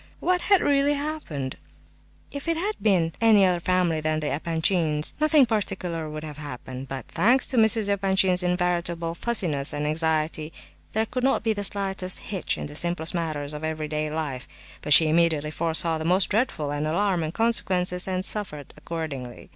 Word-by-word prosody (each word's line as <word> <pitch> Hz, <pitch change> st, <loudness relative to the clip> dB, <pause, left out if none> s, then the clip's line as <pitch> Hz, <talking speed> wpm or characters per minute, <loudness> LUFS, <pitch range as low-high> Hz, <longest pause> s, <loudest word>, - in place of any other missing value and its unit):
What 360 Hz, 0 st, 0 dB
had 395 Hz, -2 st, +3 dB
really 285 Hz, 0 st, +2 dB
happened? 280 Hz, -, -5 dB, 0.7 s
If 285 Hz, +3 st, -7 dB
it 330 Hz, -1 st, 0 dB
had 400 Hz, +6 st, -1 dB
been 175 Hz, -6 st, +1 dB
any 215 Hz, -4 st, +5 dB
other 180 Hz, -2 st, +1 dB
family 175 Hz, -3 st, 0 dB
than 155 Hz, 0 st, -1 dB
the 150 Hz, -1 st, -3 dB
Epanchins', 160 Hz, 0 st, +1 dB
nothing 305 Hz, -2 st, +4 dB
particular 185 Hz, -7 st, -3 dB
would 155 Hz, 0 st, -7 dB
have 150 Hz, -1 st, -9 dB
happened. 130 Hz, -2 st, -8 dB
But, 135 Hz, -1 st, -7 dB
thanks 240 Hz, +10 st, +2 dB
to 260 Hz, -, -2 dB
Mrs. 220 Hz, -1 st, +4 dB
Epanchin's 190 Hz, -2 st, +2 dB
invariable 175 Hz, -2 st, -1 dB
fussiness 170 Hz, -10 st, 0 dB
and 145 Hz, 0 st, -3 dB
anxiety, 155 Hz, 0 st, -1 dB, 0.4 s
there 220 Hz, +1 st, 0 dB
could 250 Hz, +3 st, -5 dB
not 265 Hz, -5 st, +1 dB
be 225 Hz, -1 st, +1 dB
the 205 Hz, -1 st, -5 dB
slightest 195 Hz, -2 st, 0 dB
hitch 190 Hz, -3 st, -3 dB
in -, -, -5 dB
the 145 Hz, -, -10 dB
simplest 170 Hz, 0 st, +1 dB
matters 155 Hz, -4 st, -3 dB
of 150 Hz, +1 st, -7 dB
everyday 155 Hz, -1 st, -3 dB
life, 150 Hz, -4 st, -5 dB, 0.3 s
but 150 Hz, -, -6 dB
she 155 Hz, +3 st, +10 dB
immediately 155 Hz, -2 st, +1 dB
foresaw 165 Hz, 0 st, +1 dB
the -, -, -4 dB
most 180 Hz, +3 st, +2 dB
dreadful 180 Hz, -, -1 dB
and 145 Hz, +1 st, -2 dB
alarming 170 Hz, -2 st, -1 dB
consequences, 185 Hz, -6 st, +2 dB
and 185 Hz, 0 st, -2 dB
suffered 170 Hz, -10 st, -3 dB
accordingly. 140 Hz, -7 st, -7 dB
170 Hz, 170 wpm, -24 LUFS, 155-200 Hz, 0.7 s, she